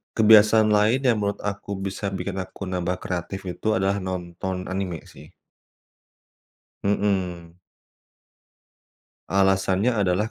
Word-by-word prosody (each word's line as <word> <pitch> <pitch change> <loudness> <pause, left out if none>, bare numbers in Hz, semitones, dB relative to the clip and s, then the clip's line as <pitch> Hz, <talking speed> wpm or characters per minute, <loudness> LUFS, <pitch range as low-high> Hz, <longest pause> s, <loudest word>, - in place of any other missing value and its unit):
kebiasaan 110 0 +6
lain 110 +6 +3
yang 120 -4 +3
menurut 100 -1 -2
aku 100 0 -4
bisa 100 +1 -3
bikin 95 0 -4
aku 95 +1 -7
nambah 90 -1 -2
kreatif 90 +2 -4
itu 100 - -6
adalah 95 0 +1
nonton 95 0 -4 0.2
anime 95 -4 -3
sih. - - -15 1.5
Mhm. 95 -4 -1 1.7
Alasannya 95 +3 +2 0.2
adalah 105 +5 0
95 Hz, 105 wpm, -24 LUFS, 95-105 Hz, 1.7 s, kebiasaan